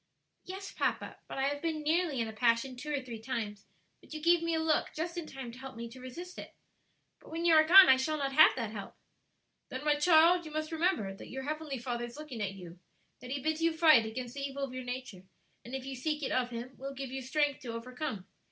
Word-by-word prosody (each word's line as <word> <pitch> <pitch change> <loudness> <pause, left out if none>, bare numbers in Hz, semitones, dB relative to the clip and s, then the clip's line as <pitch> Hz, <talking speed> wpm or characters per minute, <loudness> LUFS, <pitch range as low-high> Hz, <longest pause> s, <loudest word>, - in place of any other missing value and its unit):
"Yes, 385 +1 -7
papa; - - -2
but - - -7
I 270 - 0
have 285 +1 -1
been 315 -2 -2
nearly 315 -3 +1
in 230 - 0
a 220 - -7
passion 230 +3 +1
two 300 +5 -6
or 285 -2 0
three 235 -3 -7
times; 215 -4 -4 0.3
but - - -11
you - - -4
gave 340 +2 +4
me 335 -1 0
a - - +1
look 320 -1 +1
just 335 +2 -3
in 340 -3 -5
time 265 -3 -7
to 245 - -12
help 265 0 -8
me 235 +1 -6
to 255 +2 -12
resist 345 +9 -8
it. - - -10 0.6
But - - -16
when 330 +1 -3
you 335 - +6
are 310 0 +8
gone 370 +4 +9
I 260 - +7
shall 310 +4 -1
not 275 -2 -2
have 310 +2 +9
that 230 -4 -3
help." 205 -3 -8 0.7
"Then, 260 +2 -5
my 300 - +5
child, 335 +3 +5
you 310 - -9
must 310 +1 -3
remember 320 - 0
that 195 - -11
your 265 +1 -5
heavenly 305 -1 -3
Father 240 0 -3
is 240 +3 -10
looking 295 -7 -7
at 195 -2 -2
you; 175 -2 -11 0.4
that 250 - -10
He 270 0 -3
bids 315 +1 0
you 330 -1 +1
fight 310 -9 +6
against 240 +2 -5
the 280 - -6
evil 275 0 -4
of 265 -2 -4
your 255 0 -5
nature, 250 -6 -6 0.4
and 245 +3 -7
if 265 -1 -5
you 270 0 -5
seek 300 +3 -2
it - - -1
of 250 -1 +1
Him, 245 +2 -7
will 275 +1 -6
give 270 -1 -5
you 265 0 -4
strength 285 +2 0
to 250 -5 -6
overcome. 250 -3 -5
270 Hz, 255 wpm, -31 LUFS, 245-310 Hz, 0.7 s, gone